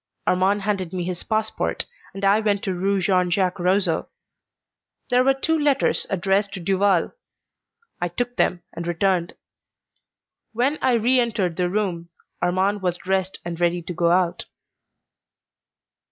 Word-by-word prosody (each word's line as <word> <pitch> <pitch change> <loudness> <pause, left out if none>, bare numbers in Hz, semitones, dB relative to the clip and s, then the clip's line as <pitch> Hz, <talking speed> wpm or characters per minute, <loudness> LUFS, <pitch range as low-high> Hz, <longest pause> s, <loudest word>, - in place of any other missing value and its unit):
Armand 195 +2 +2
handed 195 -4 -2
me 180 -1 -2
his 180 0 -3
passport, 220 0 -1 0.3
and 195 0 -3
I 200 +2 +5
went 205 -2 0
to 190 - -1
Rue 195 +2 0
Jean 180 -1 +2
Jacques 185 +1 0
Rousseau. 180 -2 +1 1.0
There 250 +1 +5
were 270 +1 +3
two 320 +4 0
letters 285 -2 +1
addressed 195 +2 +1
to - - -5
Duval. 190 0 +2 0.9
I 175 - +1
took 245 +8 -3
them 175 -6 +1
and 170 0 -6
returned. 175 0 0 1.2
When 260 +7 0
I 255 - +3
re 240 +3 +3
entered 215 -8 0
the 180 +1 0
room 180 -4 -2 0.3
Armand 190 +3 +1
was 180 -2 -1
dressed 190 +1 -1
and 170 -1 -5
ready 175 0 +1
to 180 - -5
go 170 0 +1
out. 175 0 +1
190 Hz, 145 wpm, -23 LUFS, 175-210 Hz, 1.2 s, I